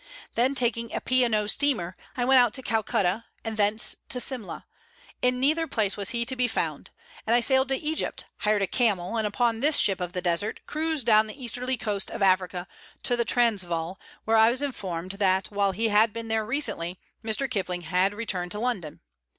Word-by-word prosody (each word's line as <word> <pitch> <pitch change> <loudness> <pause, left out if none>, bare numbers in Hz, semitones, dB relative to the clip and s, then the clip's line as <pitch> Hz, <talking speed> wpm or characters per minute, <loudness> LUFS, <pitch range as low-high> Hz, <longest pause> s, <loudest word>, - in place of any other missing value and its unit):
Then 255 +4 +2
taking 235 -2 -1
a - - 0
P. 255 0 +2
& 235 - -1
O. 210 -1 +1
steamer, 210 -7 0 0.2
I 245 - +1
went 265 0 +6
out 245 -3 +3
to 260 - -4
Calcutta, 215 -2 0 0.2
and 225 -1 -4
thence 210 +1 +2
to 250 - -2
Simla. 245 -5 -2 0.6
In 250 0 +2
neither 310 +5 +2
place 210 -7 0
was 200 0 0
he 235 0 0
to 260 +2 -1
be 250 -1 +2
found, - - -3 0.4
and 230 - +4
I - - +5
sailed 265 +2 +3
to 270 - +2
Egypt, 310 +2 -2
hired 210 -1 +1
a - - +1
camel, 205 -5 +1
and 220 -1 +1
upon 230 +2 0
this 290 +4 +4
ship 195 -2 +2
of 180 0 -4
the 180 - -2
desert 175 +5 -1
cruised 310 -4 -1
down 215 -1 +5
the 215 - -9
easterly 250 +1 -2
coast 205 -4 -2
of 205 - -3
Africa 185 -1 +1 0.4
to 245 - +2
the 235 -1 0
Transvaal, 185 -8 0 0.3
where 225 0 +3
I 220 +1 +7
was 255 +4 -1
informed 185 -10 -4
that, 190 0 +1
while 200 -1 +1
he 225 +4 0
had 215 +1 +4
been 230 0 -6
there 220 -1 0
recently, 185 - -2 0.2
Mr. 225 +5 -1
Kipling 185 -7 -2
had 180 +4 +1
returned 185 -5 -3
to 210 - -4
London. 205 -11 -3
220 Hz, 205 wpm, -26 LUFS, 195-250 Hz, 0.6 s, I